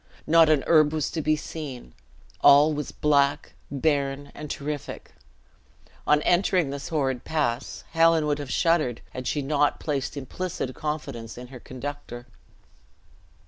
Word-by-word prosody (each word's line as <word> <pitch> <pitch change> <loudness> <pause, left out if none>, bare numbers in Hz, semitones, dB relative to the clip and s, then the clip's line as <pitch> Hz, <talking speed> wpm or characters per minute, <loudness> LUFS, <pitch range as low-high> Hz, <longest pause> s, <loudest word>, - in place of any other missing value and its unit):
Not 165 0 +6
an 150 -4 +3
herb 155 -2 +4
was 155 -2 -1
to 160 - -2
be 155 +1 +2
seen; 145 - -7 0.5
all 145 +2 +7
was 150 -1 -4
black, 140 -1 +1 0.2
barren, 140 -1 -1
and 150 -1 -8
terrific. 145 0 -5 1.0
On 150 0 +4
entering 180 -4 +2
this 140 0 -5
horrid 135 -6 -1
pass, 140 -6 -2
Helen 165 -1 +4
would 150 -1 0
have 145 -3 -6
shuddered, 155 -3 +1
had 130 0 -6
she 145 - -1
not 145 +1 +1
placed 145 -2 -3
implicit 140 -1 -4
confidence 135 -8 -5
in 125 0 -9
her 130 -2 -10
conductor. 130 -1 -7
145 Hz, 140 wpm, -25 LUFS, 135-155 Hz, 1.0 s, all